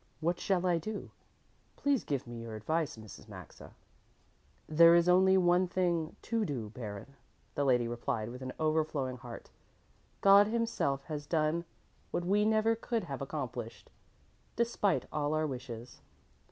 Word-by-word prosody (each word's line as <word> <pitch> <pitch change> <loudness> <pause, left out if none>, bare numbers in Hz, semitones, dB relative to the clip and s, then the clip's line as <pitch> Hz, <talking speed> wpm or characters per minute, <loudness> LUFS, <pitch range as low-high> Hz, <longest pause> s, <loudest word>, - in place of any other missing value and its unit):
What 170 +2 0
shall 185 -2 +1
I 175 -2 +2
do? 210 +5 -6 0.6
Please 285 -3 +1
give 140 -3 -2
me 120 -1 -7
your 115 -1 -7
advice, 155 +6 -1
Mrs. 110 -2 -12
Maxa." - - -12 0.9
"There 165 +2 +7
is 170 0 +4
only 190 +1 +5
one 180 0 +4
thing 175 -3 0
to 230 -1 0
do, 125 - -4
Baron," 110 +2 -8 0.4
the 145 - 0
lady 125 -3 +3
replied 115 -2 -3
with 125 +2 -9
an 130 0 -4
overflowing 155 -4 0
heart. 120 -1 -10 0.7
"God 200 +1 +7
Himself 220 -12 -1
has 150 -2 -6
done 160 +1 +1 0.4
what 175 - -2
we 205 +3 +3
never 220 +1 +3
could 230 0 -2
have - - -6
accomplished, - - -5 0.6
despite 230 -5 +1
all 150 0 0
our 155 0 +1
wishes. 125 -4 -7
155 Hz, 145 wpm, -32 LUFS, 130-185 Hz, 0.9 s, There